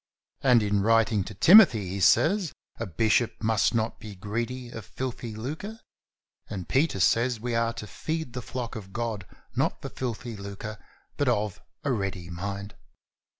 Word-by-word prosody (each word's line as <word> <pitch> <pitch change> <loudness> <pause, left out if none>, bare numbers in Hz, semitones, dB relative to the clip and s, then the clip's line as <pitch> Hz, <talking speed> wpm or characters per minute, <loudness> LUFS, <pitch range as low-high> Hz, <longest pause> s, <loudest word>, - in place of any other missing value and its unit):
And 125 -4 +5
in 100 -1 +1
writing 110 -1 +3
to 110 - -8
Timothy, 140 - +7
he 100 +2 -3
says: 165 - +4 0.3
"A 115 - -3
bishop 110 +5 +2
must 110 +1 +2
not 110 0 -1
be 105 -2 -9
greedy 120 +6 -4
of 110 - -7
filthy 120 -1 -5
lucre," 155 - -5 0.7
and 95 -4 -5
Peter 135 -7 +2
says 115 +4 +3
we 120 +2 -3
are 115 0 +1
to 115 - -7
"feed 155 - -4
the 125 - -4
flock 125 0 -5
of 95 -3 -8
God 115 -5 -3 0.3
not - - 0
for - - -6
filthy 120 -2 -4
lucre 100 +2 -7 0.4
but 145 - +1
of 105 -4 -1 0.2
a 140 - 0
ready 95 -6 -3
mind." 100 +3 -5
115 Hz, 160 wpm, -27 LUFS, 100-125 Hz, 0.7 s, Timothy